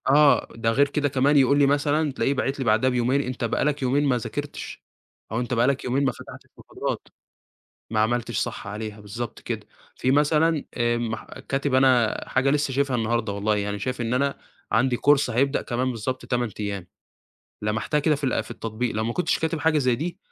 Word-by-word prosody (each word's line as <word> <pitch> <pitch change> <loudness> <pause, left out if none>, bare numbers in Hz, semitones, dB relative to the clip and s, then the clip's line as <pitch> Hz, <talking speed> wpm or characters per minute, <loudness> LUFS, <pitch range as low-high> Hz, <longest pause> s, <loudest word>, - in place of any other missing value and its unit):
آه، 145 +1 +5
ده 115 0 0
غير 140 +5 +4
كده 145 0 0
كمان 140 +2 +3
يقول 140 +1 +4
لي 140 - +6
مثلًا، 145 +2 +2
تلاقيه 135 +1 0
باعت 135 +1 -2
لي 135 - -2
بعدها 110 +3 +3
بيومين، 125 +2 +1
أنت 125 -2 -5
بقى 115 - 0
لك 150 -1 0
يومين 135 +3 +2
ما 130 -3 +2
ذاكرتش، 115 - -6 0.5
أو 110 - -1
أنت 125 0 -2
بقى 120 +1 +3
لك 140 -1 0
يومين 135 +3 +1
ما 135 - +2
فتحتش - - -12
محاضرات، - - -5 0.8
ما 110 - 0
عملتش 120 +2 0
صح - - -3
عليها 105 +1 -6
بالضبط 105 +3 -6
كده، - - -5 0.3
في 130 - 0
مثلًا 150 +2 +3
آآ 120 -1 +1
مح 110 -2 -3
كاتب 135 +1 -3
أنا 130 -4 +4
حاجة 135 - +2
لسّه 145 -1 0
شايفها 135 -1 +1
النهارده 115 -2 0
والله 105 +1 0
يعني 100 0 -2
شايف 125 +4 -3
إن 115 0 -1
أنا، 140 +2 0 0.3
عندي 120 +3 +3
كورس 145 0 +3
هيبدأ 135 +4 +1
كمان 130 +1 -1
بالضبط 125 +2 -4
8 120 -2 0
أيام، 100 -3 -4 0.8
لَمَحتها 110 +8 0
كده 150 +1 +3
في 145 0 -5
ال 125 -4 +1
في - - -14
التطبيق 115 +1 -3
لو 110 +1 -1
ما 115 - -1
كنتش 180 - 0
كاتب 160 0 -1
حاجة 155 +1 +2
زي 125 -3 +2
دي، 165 +8 -4
130 Hz, 200 wpm, -24 LUFS, 115-140 Hz, 0.8 s, لي